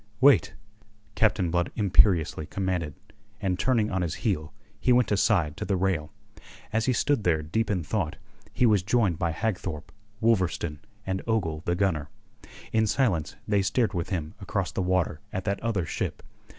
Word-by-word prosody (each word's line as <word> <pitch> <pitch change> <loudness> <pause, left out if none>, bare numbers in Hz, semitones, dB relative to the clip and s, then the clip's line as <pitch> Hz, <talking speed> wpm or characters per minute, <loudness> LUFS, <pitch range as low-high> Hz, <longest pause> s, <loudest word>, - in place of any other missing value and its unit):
"Wait," 140 +1 +5 0.6
Captain 90 -5 +2
Blood 85 0 0
imperiously 90 -6 +3
commanded, 90 -7 -2 0.4
and 95 -3 -1
turning 115 -5 +2
on 95 0 0
his 85 -1 -2
heel, 80 -7 0 0.3
he 125 - +2
went 120 -3 +4
aside 95 -7 +2
to 100 - -5
the 100 -2 0
rail. 85 -5 0 0.6
As 110 0 +1
he - - +4
stood 135 -1 +1
there 80 -4 +2
deep 110 +9 -1
in 95 -5 0
thought, 80 -1 -2 0.4
he 125 - +2
was 105 -5 +4
joined 100 -4 +1
by 85 - +1
Hagthorpe, 90 -4 -3 0.3
Wolverstone, 90 -9 +1 0.3
and 95 0 -2
Ogle 85 -9 0
the 85 - +1
gunner. 85 -6 0 0.6
In 110 -1 +3
silence 100 - +1
they 105 -2 +3
stared 110 +3 +1
with 85 -3 -2
him 80 -4 -3
across 95 -2 -2
the - - -2
water 90 -4 0
at 95 - -4
that 100 -1 -1
other 110 -7 -1
ship. - - -4
95 Hz, 165 wpm, -27 LUFS, 85-110 Hz, 0.6 s, Wait